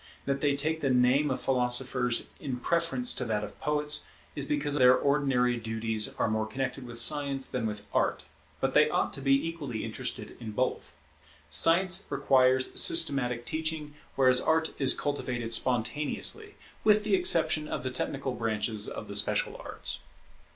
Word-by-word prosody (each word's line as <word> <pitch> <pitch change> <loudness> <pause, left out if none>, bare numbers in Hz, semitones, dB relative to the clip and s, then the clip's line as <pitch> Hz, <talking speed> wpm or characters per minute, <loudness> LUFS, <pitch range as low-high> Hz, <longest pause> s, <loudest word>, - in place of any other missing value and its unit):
That 140 0 -2
they 145 -1 +1
take 155 +3 -1
the 135 - 0
name 130 +4 +2
of 130 - -2
philosophers 125 -1 0
in 130 -3 -5
preference 170 - +1
to 125 - -2
that 105 -2 -2
of 105 - -10
poets, 150 0 0 0.3
is 145 - -4
because 145 0 -2
their 130 -3 +5
ordinary 135 -4 +1
duties 110 -1 -1
are - - 0
more 110 0 -2
connected 135 +2 -5
with 120 -1 -9
Science 140 +1 +2
than 120 -3 -3
with 105 -1 -7
Art - - 0 0.3
but - - -1
they - - +4
ought - - -1
to 135 - -5
be 135 +3 +2
equally 145 -9 -5
interested - - -5
in 110 -3 -8
both. 130 +4 -3 0.5
Science 175 - +3
requires 130 -2 +2
systematic 135 -7 +3
teaching, 155 -2 -4 0.2
whereas 130 -1 +4
Art 160 0 0
is 135 -2 +3
cultivated 120 -5 -2
spontaneously, 145 - 0 0.3
with 210 0 +4
the - - -2
exception 355 - +3
of - - -5
the 130 - -3
technical 135 +1 -3
branches 110 -2 -1
of - - -8
the - - -8
special - - 0
arts. - - -2
135 Hz, 160 wpm, -28 LUFS, 120-150 Hz, 0.5 s, their